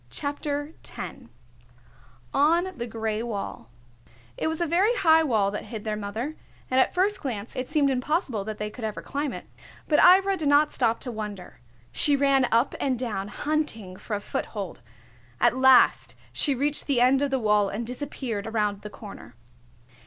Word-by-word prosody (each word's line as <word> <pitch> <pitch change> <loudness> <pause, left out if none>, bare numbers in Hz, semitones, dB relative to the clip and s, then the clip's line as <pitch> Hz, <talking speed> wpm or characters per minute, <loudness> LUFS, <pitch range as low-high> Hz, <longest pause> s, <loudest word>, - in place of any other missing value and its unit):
CHAPTER 290 - -3
X - - -7 1.1
ON 340 +6 +3
THE 235 -1 -5
GRAY 220 -1 -2
WALL 200 - -5 0.7
It - - -2
was 320 0 -2
a 345 - +1
very 375 +9 +2
high 320 -7 +5
wall 220 -10 +1
that 210 - -5
hid 220 -3 -7
their 215 -1 -2
mother, 215 +8 -4 0.4
and 260 - +3
at 260 - +2
first 390 +2 +1
glance 230 -6 -5
it 255 0 -4
seemed 295 -3 +2
impossible 260 - -1
that 215 -1 -5
they 210 0 -4
could 240 - -10
ever 215 -1 -4
climb 285 0 -3
it. - - -8 0.4
But 300 - +3
Ivra 385 +2 +6
did 310 -4 -2
not 295 +1 +4
stop 230 -3 +1
to 250 - -4
wonder. 205 - -7 0.3
She 285 - +4
ran 275 -2 +3
up 235 +4 +2
and 265 -3 0
down, 215 -5 -3
hunting 225 -6 -2
for 210 - -5
a - - -2
foothold. 200 - -5 0.6
At - - +3
last 260 -1 +5 0.2
she 285 -3 +2
reached 290 +3 -1
the 275 -4 +2
end 255 +2 +4
of 285 - +1
the 270 - +1
wall 210 -4 +2
and 225 +4 -4
disappeared 245 -4 -5
around 210 -2 -1
the 210 - -7
corner. 200 - -11
250 Hz, 175 wpm, -26 LUFS, 210-295 Hz, 1.1 s, Ivra